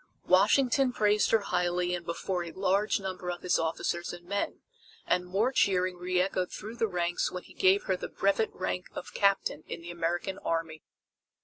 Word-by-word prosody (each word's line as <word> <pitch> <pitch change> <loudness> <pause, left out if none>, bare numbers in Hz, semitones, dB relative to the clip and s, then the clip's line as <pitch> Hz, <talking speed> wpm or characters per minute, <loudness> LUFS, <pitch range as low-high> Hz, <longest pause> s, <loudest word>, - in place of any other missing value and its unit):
Washington 270 -1 +4
praised 210 -2 +2
her 225 - +4
highly 180 -1 0
and 175 -1 -3
before 175 +2 -2
a 170 - -7
large 195 +3 +1
number 185 -2 -5
of 175 0 -5
his 180 - +2
officers 165 +1 -1
and 175 0 -10
men, 200 +2 -2 0.4
and 180 0 +1
more 205 +8 +1
cheering 185 -6 +2
reechoed 180 +1 0
through 220 +3 -7
the 225 - +2
ranks 175 -2 -1
when 180 - -6
he - - -16
gave 190 +2 +4
her 190 - 0
the - - -6
brevet 200 +3 +1
rank 180 0 -3
of - - -7
Captain 200 -6 +1
in - - -6
the 175 - -6
American 175 +3 -2
Army. 165 -2 -2
180 Hz, 180 wpm, -29 LUFS, 175-200 Hz, 0.4 s, Washington